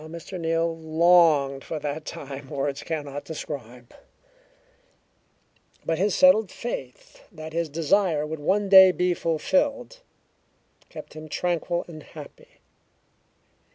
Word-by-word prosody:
How 155 - -10
Mr. 170 +3 -8
Neal 165 0 0
longed 160 -4 +3
for 160 - -5
that 150 +1 -5
time 140 -4 -8
words 140 0 -3
cannot 145 -3 -5
describe, 125 -6 -8 1.9
but 165 0 -1
his 200 +1 +1
settled 245 -8 +5
faith 135 - -7
that 155 0 -9
his 165 -1 -1
desire 165 +1 +1
would 155 0 -6
one 195 +7 0
day 190 -1 +9
be 180 0 0
fulfilled 190 - -1 0.9
kept - - -11
him 155 0 -10
tranquil 175 +1 -2
and 155 -3 -10
happy. - - -14
160 Hz, 120 wpm, -25 LUFS, 145-180 Hz, 1.9 s, day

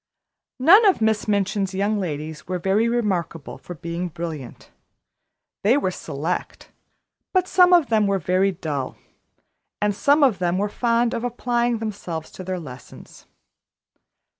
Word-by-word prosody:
None 355 - +7
of 385 - +3
Miss 220 -1 +1
Minchin's 200 -1 0
young 205 +2 0
ladies 155 -4 -5
were 185 0 -2
very 195 +6 +1
remarkable 180 - -2
for 175 - -9
being 170 +3 -4
brilliant; 160 -5 -7 0.9
they 230 +7 +4
were 185 -10 0
select, 165 +1 -5 0.6
but 370 -1 +2
some 360 -1 +5
of 345 -6 +5
them 215 -3 +3
were 200 0 +1
very 185 +3 +1
dull, 150 -7 -4 0.8
and 210 0 +1
some 285 +8 +3
of 235 -9 +3
them 175 0 0
were 205 +2 0
fond 235 +1 +1
of 230 - -3
applying 240 -1 0
themselves 195 -7 -5
to 185 - -9
their 185 0 -3
lessons. 135 -5 -12
195 Hz, 140 wpm, -23 LUFS, 170-235 Hz, 0.9 s, None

